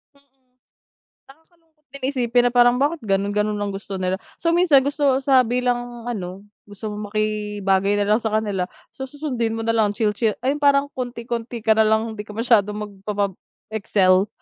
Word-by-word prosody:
Mm. 265 Hz, -2 st, -33 dB, 0.7 s
Nakakalungkot 320 Hz, +1 st, -24 dB
din 275 Hz, 0 st, -10 dB
isipin 245 Hz, -3 st, +2 dB
na 245 Hz, -, +2 dB
parang 245 Hz, 0 st, +5 dB
bakit 295 Hz, +5 st, 0 dB
ganun? 200 Hz, -1 st, 0 dB
Ganun 210 Hz, 0 st, 0 dB
lang 205 Hz, -1 st, -3 dB
gusto 195 Hz, 0 st, -6 dB
nila. 185 Hz, +1 st, -2 dB, 0.2 s
So, 335 Hz, -, 0 dB
minsan 330 Hz, -6 st, +5 dB
gusto 285 Hz, -2 st, +1 dB
sa 265 Hz, -2 st, +5 dB
bilang 245 Hz, -1 st, -1 dB
ano, 195 Hz, -5 st, -5 dB, 0.2 s
gusto 210 Hz, +1 st, -7 dB
mong 210 Hz, 0 st, -7 dB
makibagay 210 Hz, -2 st, 0 dB
na 205 Hz, -, +1 dB
lang 220 Hz, -, +3 dB
sa 220 Hz, -1 st, -2 dB
kanila. 200 Hz, -4 st, -1 dB, 0.2 s
So, 265 Hz, 0 st, -7 dB
susundin 255 Hz, -6 st, -3 dB
mo 225 Hz, -, -4 dB
na 230 Hz, -, +1 dB
lang 210 Hz, -3 st, +1 dB
chill-chill 215 Hz, 0 st, 0 dB
ah, 260 Hz, -, +1 dB
yung 295 Hz, -, -5 dB
parang 280 Hz, 0 st, +3 dB
konti-konti 235 Hz, -2 st, -5 dB
ka 220 Hz, -, +5 dB
na 220 Hz, 0 st, +4 dB
lang. 220 Hz, +1 st, +1 dB
Di 210 Hz, -, -5 dB
ka 210 Hz, -, -9 dB
masyadong 215 Hz, -3 st, +2 dB
magppapab 205 Hz, -1 st, -3 dB, 0.4 s
excel. 195 Hz, -2 st, +3 dB
225 Hz, 180 wpm, -22 LUFS, 205-260 Hz, 0.7 s, parang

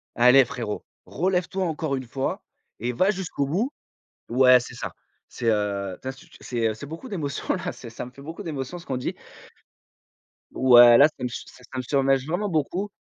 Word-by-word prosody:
«Allez 125 Hz, +3 st, +7 dB
frérot, 120 Hz, -5 st, -5 dB, 0.2 s
relève 180 Hz, +2 st, 0 dB
toi 190 Hz, 0 st, -2 dB
encore 155 Hz, -3 st, -2 dB
une 130 Hz, -, -4 dB
fois 135 Hz, +2 st, -3 dB, 0.4 s
et 120 Hz, +3 st, -1 dB
va 185 Hz, +11 st, +2 dB
jusqu'au 185 Hz, -8 st, -2 dB
bout!» 205 Hz, -, -1 dB, 0.6 s
ouais, 125 Hz, 0 st, +6 dB
c'est -, -, -9 dB
ça. -, -, -5 dB, 0.4 s
C'est, 120 Hz, -, -5 dB
heu, 100 Hz, -3 st, -1 dB
tu 130 Hz, -, -5 dB
as 130 Hz, -, -2 dB
sut 135 Hz, -, -17 dB
c'est, 115 Hz, -3 st, -1 dB
heu, 110 Hz, -, -2 dB
c'est 110 Hz, -, -9 dB
beaucoup 165 Hz, -, -8 dB
d' 210 Hz, -, -5 dB
émotion 145 Hz, -6 st, -2 dB
là, -, -, -3 dB
c'est -, -, -11 dB
ça -, -, -7 dB
me 125 Hz, -, -10 dB
fait 140 Hz, -, -15 dB
beaucoup 165 Hz, +7 st, -7 dB
d'émotion 155 Hz, 0 st, -5 dB
ce 170 Hz, -, -13 dB
qu'on 130 Hz, -2 st, -3 dB
dit. -, -, -3 dB, 1.4 s
Ouais, 120 Hz, -2 st, +8 dB
là 145 Hz, -, +8 dB
ça 155 Hz, -, -13 dB
me 125 Hz, -, -1 dB
ça 125 Hz, -, -10 dB
me 130 Hz, -, 0 dB
submerge 135 Hz, +1 st, +1 dB
vraiment 190 Hz, +5 st, -1 dB
beaucoup 175 Hz, +5 st, -1 dB
135 Hz, 205 wpm, -25 LUFS, 125-165 Hz, 1.4 s, Ouais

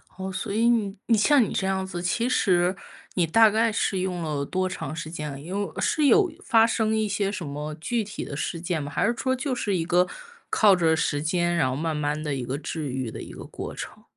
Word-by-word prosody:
哦， 190 Hz, 0 st, -5 dB
所 185 Hz, -, -4 dB
以 230 Hz, +3 st, +3 dB
你 215 Hz, -5 st, +1 dB
你 225 Hz, -2 st, +4 dB
像 275 Hz, +4 st, +5 dB
你 -, -, -3 dB
这 190 Hz, -, 0 dB
样 190 Hz, 0 st, 0 dB
子， 175 Hz, -2 st, -5 dB
其 230 Hz, +7 st, 0 dB
实 180 Hz, -6 st, +2 dB, 0.4 s
你 175 Hz, -3 st, +1 dB
大 220 Hz, +6 st, +6 dB
概 225 Hz, +2 st, +2 dB
是 195 Hz, -3 st, 0 dB
用 180 Hz, -2 st, -2 dB
了 145 Hz, -3 st, -2 dB
多 185 Hz, +4 st, -1 dB
长 155 Hz, -5 st, -5 dB
时 160 Hz, -1 st, -6 dB
间， 150 Hz, -3 st, -6 dB
因 180 Hz, -, -7 dB
为 -, -, -13 dB
是 300 Hz, -, +2 dB
有 385 Hz, 0 st, +5 dB
发 225 Hz, -1 st, +5 dB
生 220 Hz, -1 st, +1 dB
一 220 Hz, -1 st, +1 dB
些 200 Hz, 0 st, 0 dB
什 190 Hz, -5 st, -5 dB
么 150 Hz, +2 st, -5 dB
具 225 Hz, +9 st, -1 dB
体 200 Hz, -1 st, -6 dB
的 140 Hz, -, -6 dB
事 165 Hz, +3 st, -3 dB
件 170 Hz, -2 st, -2 dB
吗？ 145 Hz, -, -6 dB
还 -, -, +1 dB
是 235 Hz, -, +2 dB
说 260 Hz, +3 st, 0 dB
就 260 Hz, +1 st, -2 dB
是 210 Hz, -5 st, -1 dB
一 165 Hz, -2 st, -1 dB
个 180 Hz, +1 st, +3 dB, 0.4 s
靠 205 Hz, -3 st, +5 dB
着 165 Hz, -3 st, +3 dB
时 150 Hz, -2 st, 0 dB
间， 175 Hz, +2 st, +1 dB
然 130 Hz, -6 st, +2 dB
后 130 Hz, -, -2 dB
慢 160 Hz, +2 st, -2 dB
慢 150 Hz, +1 st, -1 dB
地 150 Hz, -, -2 dB
一 130 Hz, -2 st, -3 dB
个 130 Hz, +3 st, -3 dB
治 155 Hz, 0 st, -4 dB
愈 130 Hz, -3 st, -3 dB
的 -, -, -7 dB
一 -, -, -9 dB
个 -, -, -9 dB
过 -, -, -7 dB
程。 -, -, -8 dB
180 Hz, 265 characters per minute, -25 LUFS, 155-215 Hz, 0.4 s, 大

